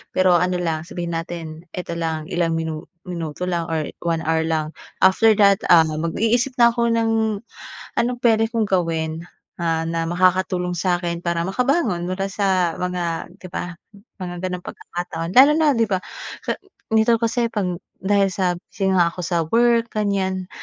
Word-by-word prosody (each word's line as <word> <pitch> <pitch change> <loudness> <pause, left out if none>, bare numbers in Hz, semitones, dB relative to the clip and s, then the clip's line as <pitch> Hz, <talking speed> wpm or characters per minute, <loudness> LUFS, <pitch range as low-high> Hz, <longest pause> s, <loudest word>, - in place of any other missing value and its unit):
Pero 185 -2 +5
ano 180 +1 +1
lang, 160 -1 -2
sabihin 175 -2 -4
natin 165 -1 -6
eto 170 -2 -4
lang, 160 -1 -3
ilang 170 -1 +1
minu 160 0 -3 0.2
minuto 170 -2 -5
lang 170 -1 -1
or 160 -2 -1 0.2
1 165 -1 0
hour 160 +1 +1
lang, 155 -1 -1 0.3
after 215 +4 +6
that, 200 -2 +5
ah, 165 -2 +8
mag-iisip 220 - 0
na 235 0 +8
ako 235 0 0
ng 225 -1 +1 0.9
anong 245 +1 0
pwede 225 -1 +4
kong 225 -2 +1
gawin, 165 -2 -1 0.3
ah, 165 -1 0
na 165 0 -1
makakatulong 180 0 +1
sa'kin 175 -1 0
para 170 -1 0
makabangon 230 - 0
mula 195 +1 -2
sa 185 -4 +1
mga 175 -1 -3
di 185 - -10
ba, 180 -1 -4 0.5
mga 175 -1 -4
gano'ng 180 -1 -4
pagkakataon. 170 -1 -5
Lalo 275 +3 +9
na, 315 -1 +3
di 230 - +3
ba, 190 - +2 0.5
ka - - +1 0.4
nito 220 +1 +4
kasi 230 +1 +1
pang 185 -6 -2 0.2
dahil 200 0 +3
sa 185 -2 +1
busy 190 +1 -2
nga 175 -3 +4
ako - - -11
sa 175 0 0
work, 235 +2 +2
ganyan. 190 -3 -1
180 Hz, 165 wpm, -21 LUFS, 165-205 Hz, 0.9 s, Lalo